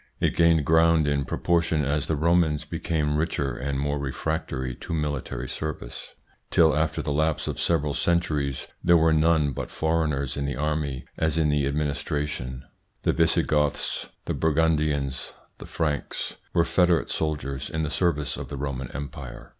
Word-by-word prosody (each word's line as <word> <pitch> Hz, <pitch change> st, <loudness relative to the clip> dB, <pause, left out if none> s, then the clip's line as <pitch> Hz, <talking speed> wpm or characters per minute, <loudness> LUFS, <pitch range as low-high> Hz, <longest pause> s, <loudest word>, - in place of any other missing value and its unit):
It -, -, +1 dB
gained 85 Hz, -3 st, +4 dB
ground 80 Hz, 0 st, +4 dB
in 70 Hz, -1 st, +1 dB
proportion 85 Hz, -3 st, +1 dB
as 75 Hz, +1 st, 0 dB
the 80 Hz, -, +1 dB
Romans 80 Hz, -1 st, +2 dB
became 75 Hz, -2 st, -1 dB
richer 75 Hz, -5 st, -1 dB
and 70 Hz, +2 st, -2 dB
more 70 Hz, +1 st, -1 dB
refractory 65 Hz, -2 st, -2 dB
to 80 Hz, -, -4 dB
military 75 Hz, -5 st, -3 dB
service, 75 Hz, -3 st, -6 dB, 0.3 s
till, 80 Hz, -3 st, +5 dB
after 80 Hz, +1 st, 0 dB
the 75 Hz, -, -2 dB
lapse 80 Hz, +1 st, +1 dB
of -, -, -3 dB
several 75 Hz, -4 st, +1 dB
centuries, 75 Hz, -6 st, 0 dB, 0.2 s
there 85 Hz, 0 st, +6 dB
were 80 Hz, 0 st, +4 dB
none 80 Hz, -2 st, +3 dB
but -, -, -5 dB
foreigners 80 Hz, -5 st, 0 dB
in 70 Hz, -, -2 dB
the 70 Hz, -, -2 dB
army 75 Hz, -2 st, -2 dB
as 80 Hz, 0 st, +1 dB
in 80 Hz, -2 st, +3 dB
the 75 Hz, -2 st, +2 dB
administration: 70 Hz, -2 st, -2 dB, 0.2 s
" -, -, -45 dB
The -, -, +2 dB
Visigoths, 75 Hz, -1 st, +1 dB, 0.2 s
the -, -, -1 dB
Burgundians, 75 Hz, -4 st, +1 dB, 0.3 s
the -, -, -9 dB
Franks 75 Hz, -3 st, -2 dB
were 85 Hz, -, +3 dB
federate 90 Hz, -2 st, +2 dB
soldiers 75 Hz, -4 st, -2 dB
in 80 Hz, 0 st, -2 dB
the 75 Hz, -, -2 dB
service 80 Hz, -5 st, 0 dB
of -, -, -6 dB
the 70 Hz, -, -5 dB
Roman 65 Hz, -2 st, -3 dB
Empire." 70 Hz, -1 st, -7 dB
75 Hz, 160 wpm, -26 LUFS, 70-80 Hz, 0.3 s, there